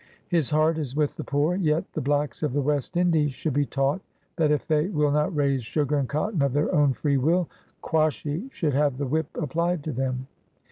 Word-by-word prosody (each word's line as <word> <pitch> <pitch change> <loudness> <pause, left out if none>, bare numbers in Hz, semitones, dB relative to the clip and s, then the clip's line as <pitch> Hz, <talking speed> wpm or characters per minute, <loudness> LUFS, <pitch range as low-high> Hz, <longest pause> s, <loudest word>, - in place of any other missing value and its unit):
His 165 -7 +1
heart 155 +1 +2
is 135 -4 -4
with 150 -1 0
the - - -5
poor; 145 +4 +1
yet 160 -4 0
the - - -2
blacks 145 +2 -1
of 150 -5 -1
the 145 - +1
West 145 +4 -1
Indies 160 -5 +2
should 150 +2 -3
be 145 0 +1
taught, 135 +6 0 0.3
that 160 -3 +2
if 150 -1 +1
they 155 +1 +2
will 150 -6 +1
not 150 +2 +1
raise 140 -3 +1
sugar 150 +5 0
and 135 -3 -1
cotton 155 +4 -1
of 140 -2 +1
their 145 +2 +1
own 145 -2 +4
free 140 +4 0
will, 165 +6 +2 0.2
* - - -38
Quashy 155 - 0
should 155 - -1
have 140 -1 +2
the 140 - -2
whip 155 +3 0
applied 170 +2 -1
to 155 - -3
him.' 130 0 -2
150 Hz, 220 wpm, -25 LUFS, 140-160 Hz, 0.3 s, own